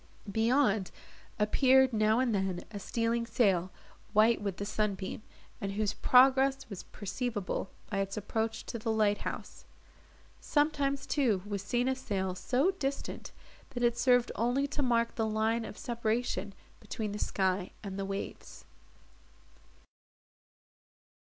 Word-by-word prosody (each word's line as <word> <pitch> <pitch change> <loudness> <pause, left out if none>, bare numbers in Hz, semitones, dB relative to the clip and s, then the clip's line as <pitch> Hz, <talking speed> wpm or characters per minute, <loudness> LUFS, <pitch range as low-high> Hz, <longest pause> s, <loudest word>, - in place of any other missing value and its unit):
Beyond, 220 -2 +2 0.5
appeared, 260 +4 +4
now 215 0 +3
and 255 -3 +1
then, 190 -3 -1
a 205 - -5
stealing 230 +3 -1
sail, 190 -8 +2 0.4
white 220 +2 +4
with 200 -3 -3
the 200 - -3
sunbeam, 205 -2 -2 0.4
and 195 -1 -2
whose 210 0 0
progress 265 +1 +4
was 195 - -5
perceivable 205 -2 -4 0.2
by 195 - 0
its 195 0 -2
approach 220 +2 -2
to 230 - -5
the 225 +1 -1
light 210 -2 +2
house. - - -6 0.8
Sometimes, 285 -2 +1
too, 245 -10 +1
was 205 -2 -3
seen 240 +5 0
a 265 - +2
sail 195 -8 -2
so 250 - +1
distant, 280 -7 -4 0.4
that 245 - -1
it 240 -1 +3
served 245 0 +3
only 245 +5 +1
to 285 - -2
mark 235 -3 +2
the 225 -1 -1
line 220 +1 0
of 210 - -8
separation 230 -5 -2 0.2
between 215 0 -4
the 210 - -5
sky 190 -1 0
and 195 -1 -5
the 195 - -2
waves. 195 0 -6
220 Hz, 135 wpm, -31 LUFS, 200-250 Hz, 0.8 s, appeared